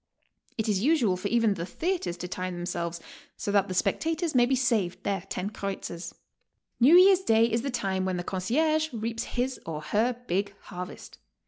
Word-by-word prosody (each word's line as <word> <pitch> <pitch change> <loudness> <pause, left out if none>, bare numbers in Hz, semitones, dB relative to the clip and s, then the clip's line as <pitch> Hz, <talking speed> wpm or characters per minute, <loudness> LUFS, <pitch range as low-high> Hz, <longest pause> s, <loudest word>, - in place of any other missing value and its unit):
It 220 - -1
is 200 -3 +1
usual 250 - +3
for 185 +3 -3
even 230 -1 +3
the 170 -4 -5
theatres 325 - -2
to 180 - -5
time 185 0 -4
themselves 175 -1 -3 0.4
so 205 - -3
that 200 -1 +3
the 185 - -4
spectators 325 - 0
may 245 -2 +5
be 265 - +2
siaved 230 -8 0
their 200 -1 0 0.2
lo 185 - -2
kreuzers. 195 -4 -5 0.7
New 270 +8 +7
Year's 370 +1 +8
day 225 -10 +4
is 230 0 0
the 275 - -3
time 190 -6 -1
when 185 -1 -1
the 175 - -3
concierge 310 - 0
reaps 230 0 -3
his 255 +1 -2
or 155 -2 -5
her 230 +8 0
big 200 +1 -1
harvest. 180 -2 -9
210 Hz, 185 wpm, -27 LUFS, 185-255 Hz, 0.7 s, Year's